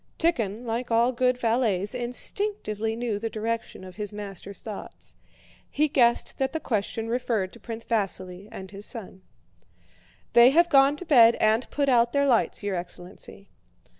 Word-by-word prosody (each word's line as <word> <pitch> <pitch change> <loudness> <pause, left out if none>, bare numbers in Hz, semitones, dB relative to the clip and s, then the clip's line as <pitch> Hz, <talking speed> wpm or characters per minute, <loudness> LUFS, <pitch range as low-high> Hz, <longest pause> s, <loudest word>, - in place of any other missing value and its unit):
Tíkhon, 235 - 0
like 235 +2 -3
all 235 +2 +3
good 250 0 +1
valets, 225 -4 0
instinctively 245 - -2
knew 230 -3 -2
the 225 +1 -3
direction 225 -2 -4
of 185 0 -11
his 210 -2 -4
master's 200 -1 -8
thoughts. 215 -3 -9 0.6
He 305 +2 +1
guessed 240 -4 +2
that 265 +1 0
the 320 - -1
question 225 -2 -2
referred 225 -6 -1
to - - -12
Prince 230 -1 -7
Vasíli 195 -3 -2
and 190 0 -9
his 200 +1 -6
son. 195 -5 -7 1.1
"They 235 +1 +8
have 340 +5 +4
gone 275 0 +5
to 360 - -9
bed 235 -7 +6
and 220 +3 +1
put 285 -1 -1
out 240 -2 +3
their 280 0 +2
lights, 240 -5 +1
your 200 -2 -1
excellency." 180 +3 -9
230 Hz, 160 wpm, -26 LUFS, 205-250 Hz, 1.1 s, They